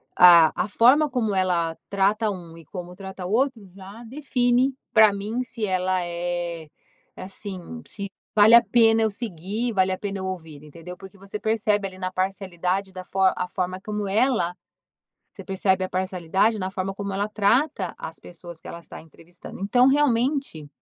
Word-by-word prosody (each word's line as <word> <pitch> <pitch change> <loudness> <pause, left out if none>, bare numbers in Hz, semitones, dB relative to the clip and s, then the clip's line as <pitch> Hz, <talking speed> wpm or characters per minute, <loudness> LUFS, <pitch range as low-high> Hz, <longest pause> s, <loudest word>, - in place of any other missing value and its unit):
a 170 -3 +8
a - - -1
forma 260 +8 +4
como 235 -5 -1
ela 175 -4 0
trata 205 +3 +1
1 170 -4 -9
e 165 - -14
como 180 +2 -8
trata 190 -1 -8
o 180 - -4
outro, 255 +1 +1
já 200 +4 -11
define, 250 0 +1 0.2
pra 220 -2 +6
mim, 210 +5 -3
se 230 -3 -4
ela 185 -1 0
é 175 -1 -4 0.5
assim, 195 +3 -8
se 200 -2 -6 0.3
vale 215 +2 +8
a 235 - +8
pena 225 -2 +4
eu 220 -1 +1
seguir, 210 +3 -4
vale 190 -1 +2
a 185 - -2
pena 200 -1 -5
eu 190 - -4
ouvir, 160 -6 -7
entendeu? 165 +4 -10
Porque 195 +1 -13
você 195 +2 -7
percebe 215 -2 0
ali 185 -1 -12
na 185 -1 -3
parcialidade 190 0 -2
da 185 -1 -7 0.3
a 180 - -3
forma 185 0 -3
como 210 0 -4
ela 210 -4 +1 0.8
você - - -10
percebe 190 -1 0
a - - -4
parcialidade 190 +3 0
na 185 -1 -3
forma 190 0 -4
como 200 0 -5
ela 200 +2 -1
trata 215 - +1
as 160 - -8
pessoas 175 -1 -12
que - - -12
ela 170 - -7
está - - -11
entrevistando. 165 +2 -13
Então, 245 +6 +4
realmente, 270 - +1
195 Hz, 175 wpm, -24 LUFS, 180-220 Hz, 0.8 s, a